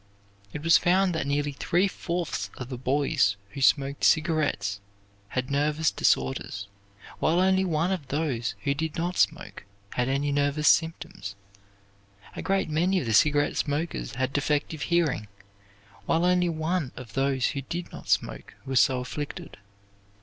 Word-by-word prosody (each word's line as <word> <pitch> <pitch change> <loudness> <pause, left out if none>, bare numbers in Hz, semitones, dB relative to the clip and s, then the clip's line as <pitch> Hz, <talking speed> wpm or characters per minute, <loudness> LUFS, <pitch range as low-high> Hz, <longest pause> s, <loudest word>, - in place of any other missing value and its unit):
It 150 - -6
was 165 0 +6
found 185 +2 +3
that 160 - -2
nearly 145 +1 0
three 175 +7 +1
fourths 175 -3 -3
of 130 -1 -7
the 125 - -5
boys 135 -5 +2 0.2
who 140 - -7
smoked 140 +1 +2
cigarettes 150 - +2 0.5
had 125 +5 -3
nervous 150 +2 +1
disorders, 65 +9 0 0.5
while 165 +3 +2
only 190 0 +3
one 170 0 0
of 175 -8 -3
those 135 -5 -1
who 140 - +1
did 155 +2 -3
not 175 +1 -2
smoke 160 - 0 0.3
had 125 +1 -1
any 140 +2 0
nervous 145 +1 +1
symptoms. 165 - +1 1.0
A - - -4
great 195 0 0
many 175 +5 +1
of 155 - -4
the 115 - -1
cigarette 145 +5 +3
smokers 145 - -2
had 130 +1 -1
defective 145 +1 -1
hearing, 160 -11 +1 0.8
while 165 +2 +2
only 180 -1 +3
one 160 -2 -1
of 120 -5 -10
those 135 -1 +1
who 140 - -3
did 170 +6 -5
not - - -10
smoke - - -1
was 130 -2 +2
so 130 -2 +3
afflicted. 145 0 -6
145 Hz, 150 wpm, -27 LUFS, 130-165 Hz, 1.0 s, was